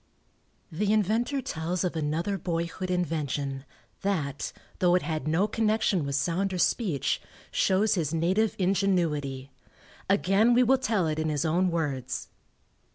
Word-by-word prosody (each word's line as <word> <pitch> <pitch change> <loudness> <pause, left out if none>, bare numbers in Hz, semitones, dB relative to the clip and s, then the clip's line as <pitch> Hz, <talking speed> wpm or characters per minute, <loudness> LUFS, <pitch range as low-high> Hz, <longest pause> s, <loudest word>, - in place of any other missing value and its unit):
The 200 +6 0
inventor 225 +6 +1
tells 170 +1 -2
of 180 -2 -1
another 160 +5 -1
boyhood 170 +2 -3
invention 145 -6 -2 0.4
that, 150 -9 -2 0.3
though 180 -1 +4
it 180 - +1
had 155 -3 -3
no 170 +7 +2
connection 215 -7 +1
with 140 - -1
sound 180 +6 0
or - - -2
speech, 180 - +1 0.3
shows 200 +3 +2
his 165 -7 0
native 185 +7 +1
ingenuity. 165 -9 0 0.6
Again 200 +4 +4
we 250 - +6
will 260 +2 +4
tell 215 -8 +1
it 155 0 -1
in 155 0 0
his 150 +1 -1
own 175 +4 +2
words. 145 -7 -3
175 Hz, 140 wpm, -27 LUFS, 155-200 Hz, 0.6 s, we